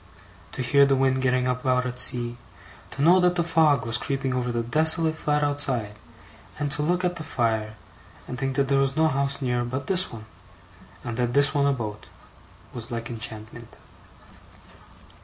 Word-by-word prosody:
To 130 - -3
hear 140 +3 +4
the 135 - +3
wind 130 0 +1
getting 130 -1 +1
up 125 0 -2
out 125 -1 +1
at 125 0 -2
sea, 120 -1 +2 0.5
to 135 +4 -3
know 175 +4 +6
that 180 0 +2
the 170 - +1
fog 160 -5 +2
was 115 0 0
creeping 135 -1 -2
over 125 -1 -1
the 120 0 -2
desolate 160 +5 +2
flat 150 -1 -1
outside, 135 -7 +1 0.6
and 145 -1 -2
to 145 +1 +1
look 180 +4 0
at 180 0 -1
the 160 - -6
fire, 110 -6 -1 0.5
and 125 - -5
think 135 0 -2
that 140 -1 +1
there 135 0 +2
was 135 +1 0
no 160 0 +4
house 140 -1 -1
near 125 -1 0
but 130 +3 -4
this 185 -1 0
one, 110 -2 -9 0.8
and 120 -1 -5
this 140 +4 +2
one 140 -1 +2
a - - +3
boat, 105 -5 -6 0.7
was 120 -1 -4
like 115 -1 -5
enchantment. 110 0 -8
130 Hz, 180 wpm, -25 LUFS, 120-145 Hz, 0.8 s, know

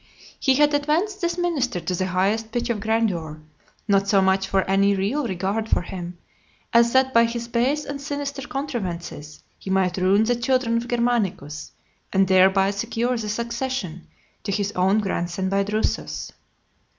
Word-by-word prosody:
He 265 -2 +3
had 295 +1 +4
advanced 320 +8 0
this 345 0 -1
minister 285 - 0
to 170 +2 -3
the 185 +1 -1
highest 200 +5 0
pitch 240 0 -1
of 220 - -2
grandeur, 195 -8 -1 0.5
not 200 -1 +3
so 200 -1 +4
much 190 0 +2
from 195 -1 +2
any 200 +1 +3
real 230 +9 -1
regard 200 +3 -2
for - - +2
him, 175 -1 -7 0.6
as 235 0 +5
that 260 0 +3
by 230 0 +6
his 235 0 -4
base 255 +6 0
and 280 0 -6
sinister 285 -1 -4
contrivances 180 - -5 0.2
he - - -8
might 190 -1 +1
ruin 190 +3 +3
the 240 +2 +1
children 240 -1 +1
of 235 +1 -3
Germanicus, 215 - -1 0.4
and 195 0 +3
thereby 190 +1 +4
secure 230 +4 -1
the 220 -3 -3
succession 235 -6 -3 0.3
to 200 - -4
his 205 0 -1
own 195 +3 +2
grandson 185 -1 -2
by 195 +1 +2
Drusus. 210 +2 -2
215 Hz, 165 wpm, -23 LUFS, 190-245 Hz, 0.6 s, by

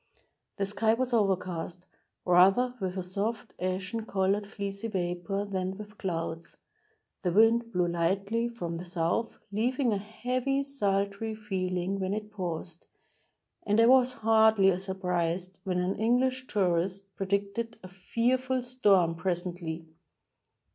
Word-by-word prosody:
The 200 - 0
sky 215 +3 +2
was 255 +1 -1
overcast, 185 -4 0 0.4
rather 195 +8 +5
with 190 0 -2
a 185 - -2
soft, 205 +5 -3
ashen 185 +5 -2
colored 200 +1 +1
fleecy 200 +1 -4
vapor 180 0 -2
than 190 -1 -3
with 210 0 -10
clouds; 165 -3 -4 0.6
the 180 - 0
wind 230 +4 +4
blew 180 -3 +1
lightly 195 +7 0
from 175 -8 -5
the 175 - -7
south, 175 +6 -1
leaving 245 +3 +1
a 200 - 0
heavy, 250 +6 -1
sultry 205 -4 -1
feeling 190 -2 -2
when 190 +1 -1
it 210 0 -6
paused, 175 -4 -5 0.8
and 210 +2 +2
I 230 - +7
was 255 +1 +5
hardly 220 -4 +5
surprised 180 -1 -2
when 185 -2 0
an 180 +2 -1
English 255 +3 +2
tourist 185 0 0
pre 195 - -3
dicted 200 +4 -1
"a. - - -7
fearful 245 +7 0
storm, 205 -9 +3
presently." 175 -2 -3
195 Hz, 130 wpm, -29 LUFS, 180-225 Hz, 0.8 s, I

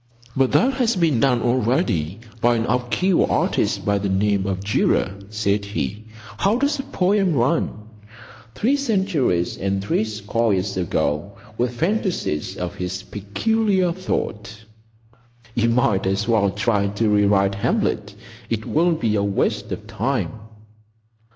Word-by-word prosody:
"But 130 -1 +2
that 265 +3 +4
has 245 -4 +1
been 165 -9 +2
done 125 -3 +2
already 110 - 0 0.2
by 120 0 +4
an 115 0 0
obscure 125 +10 +1
artist - - 0
by 100 0 +2
the 100 0 -2
name 100 0 +1
of 95 0 -2
Durer," 100 -1 +1 0.2
said 105 -1 0
he. 105 +1 -4 0.3
"How 205 +4 +2
does 280 +3 +1
the - - -2
poem 190 -2 +2
run?— 120 -5 0 0.7
"Three 265 +6 +2
centuries 190 - 0
and 95 0 -1
threescore 105 +2 0
years 100 +2 -2
ago, 85 0 -1 0.2
With 120 +1 -1
phantasies 175 - -1
of 90 -1 -4
his 95 +1 -4
peculiar 190 - 0
thought. 110 - -4 0.9
You 115 0 +2
might 110 -5 +2
as 100 +3 0
well 110 -4 +3
try 105 0 +1
to 100 +3 -1
rewrite 100 -1 +3
Hamlet. 100 0 -1 0.3
It 110 -1 -2
will 170 +3 +2
be 115 -9 0
a 100 - +1
waste 100 -1 -1
of - - -5
time. - - -1
110 Hz, 140 wpm, -22 LUFS, 100-160 Hz, 0.9 s, that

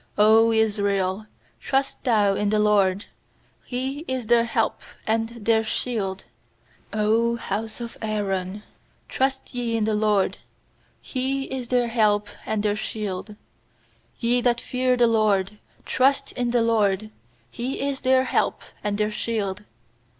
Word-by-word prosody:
90 220 +2 +5
Israel, 200 -2 0 0.3
trust 270 0 -1
thou 210 -5 +3
in 205 +1 0
the 215 - +2
LORD! 205 -2 +3 0.6
He 265 +3 -3
is 260 -2 -2
their 235 +1 +4
help - - 0 0.3
and 225 +1 0 0.2
their 225 -1 +4
shield! 210 -4 -2 0.7
100 225 +2 +2
house 215 +2 -4
of 235 -1 -7
Aaron, 205 -2 -2 0.4
trust 265 0 -1
ye 235 -2 -1
in 220 - 0
the 215 0 +1
LORD! 210 -2 +1 0.6
He 270 +1 -2
is 265 -2 -5
their 245 -1 +2
help 210 -3 +2 0.2
and 215 -1 -1
their 205 -1 +1
shield! 210 -1 -4 0.9
nYe 245 +1 +3
that 240 -1 +2
fear 255 0 0
the 240 - +5
LORD, 210 -3 +1 0.3
trust 275 +1 +2
in 245 -1 -2
the 235 -1 +2
LORD! 215 -2 +1 0.4
He 250 +3 -4
is 275 -1 -3
their 260 0 +4
help 260 - 0 0.2
and 205 -1 -1
their 210 0 0
shield. 210 -2 -3
220 Hz, 135 wpm, -24 LUFS, 210-245 Hz, 0.9 s, 90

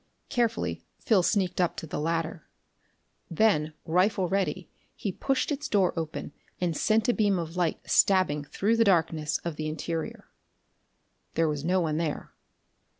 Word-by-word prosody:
Carefully 235 -2 -1
Phil 210 -5 +3
sneaked 185 -1 +1
up 175 - 0
to - - -5
the 150 - -4
latter. 165 +1 -2 0.8
Then, 165 -4 +2
rifle 185 +3 +2
ready, 190 -1 -1 0.3
he 200 - -3
pushed 270 - -1
its 295 +1 -2
door 195 -4 +3
open 155 -4 -4 0.3
and 175 -3 0
sent 215 +7 +2
a 245 - +4
beam 205 -4 +2
of 165 0 -4
light 175 -3 0
stabbing 185 -7 +3
through 215 +9 0
the 230 - +5
darkness 160 -6 +2
of 165 -3 -3
the 155 - -3
interior. 160 +1 -4 1.1
There 165 0 +3
was 150 -2 -2
no 180 +3 +2
one 155 -2 0
there. 160 -3 -3
175 Hz, 150 wpm, -28 LUFS, 160-200 Hz, 1.1 s, the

